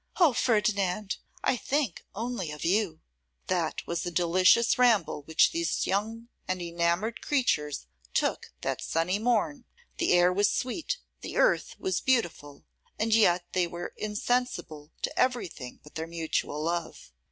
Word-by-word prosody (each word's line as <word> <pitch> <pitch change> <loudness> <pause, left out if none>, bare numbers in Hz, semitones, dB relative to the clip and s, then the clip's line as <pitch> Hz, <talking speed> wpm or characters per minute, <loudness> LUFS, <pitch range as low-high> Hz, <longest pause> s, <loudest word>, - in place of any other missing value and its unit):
O 330 -7 +6
Ferdinand! 210 -4 +1 0.3
I - - +3
think 260 - -1
only 225 -5 -3
of 150 +1 -6
you!' 185 -2 +1 0.4
That - - -1
was 170 0 -2
a 175 - -2
delicious 185 +8 +4
ramble 230 -10 +3
which 160 +2 +4
these 335 +1 0
young 225 +4 -2 0.2
and 185 0 -1
enamoured 170 +6 -1
creatures 150 - 0 0.3
took - - 0
that - - -2
sunny 180 +5 0
morn! 245 +3 0 0.3
The 340 - +3
air 175 +1 +5
was 205 +2 +3
sweet, 290 - -2 0.2
the - - -6
earth - - +2
was 380 -1 -1
beautiful, 175 - -1 0.3
and 220 +1 +1
yet 180 -5 +4
they 180 -1 +2
were 175 +1 -6
insensible 210 -8 -2
to - - -2
everything 205 - -1
but 150 - -15
their 160 -1 -4
mutual 160 -2 -2
love. 170 - -3
195 Hz, 140 wpm, -28 LUFS, 170-235 Hz, 0.4 s, O